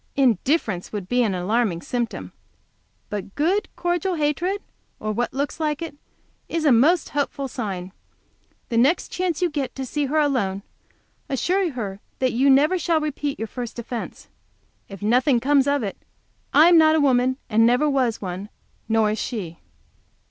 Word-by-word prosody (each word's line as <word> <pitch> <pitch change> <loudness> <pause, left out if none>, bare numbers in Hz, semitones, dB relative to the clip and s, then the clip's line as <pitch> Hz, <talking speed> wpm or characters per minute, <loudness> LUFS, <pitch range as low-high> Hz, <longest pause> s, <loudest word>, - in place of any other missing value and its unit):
Indifference 240 - +1
would 205 -4 -5
be 245 +3 +2
an 210 -5 +1
alarming 185 -1 0
symptom, 240 -2 -3 0.8
but 200 -1 -5
good, 365 +8 +1
cordial 350 +1 -1
hatred, 330 +6 0 0.4
or 215 - -2
what 240 +3 -1
looks 285 +4 -3
like 305 -2 -1
it, 330 -3 -6 0.5
is 330 -1 -1
a 290 - +6
most 295 +9 +4
hopeful 280 -1 -2
sign. 195 -8 -5 0.8
The 230 - +1
next 280 +9 +2
chance 360 -2 -1
you 355 - +3
get 285 -3 -3
to 265 - -4
see 290 +3 -1
her 300 +4 0
alone, 240 -10 +1 0.7
assure 350 +5 0
her 200 -6 -5 0.2
that 255 -1 +1
you 265 +4 +3
never 300 +7 +4
shall 330 -1 +2
repeat 295 -2 -3
your 225 - -4
first 240 +1 -6
offence. 235 0 -6 0.6
If 195 0 -9
nothing 245 +4 +3
comes 275 +2 +3
of 285 -3 +1
it 200 - -4 0.5
I 310 +3 +7
am 345 -1 +7
not 315 0 +5
a - - +3
woman, 260 -2 +3
and 225 0 +3
never 250 +5 +3
was 260 -5 +1
one; 190 +1 -5 0.4
nor 220 -1 +3
is 215 - -3
she. 180 -9 -5
260 Hz, 165 wpm, -23 LUFS, 220-300 Hz, 0.8 s, I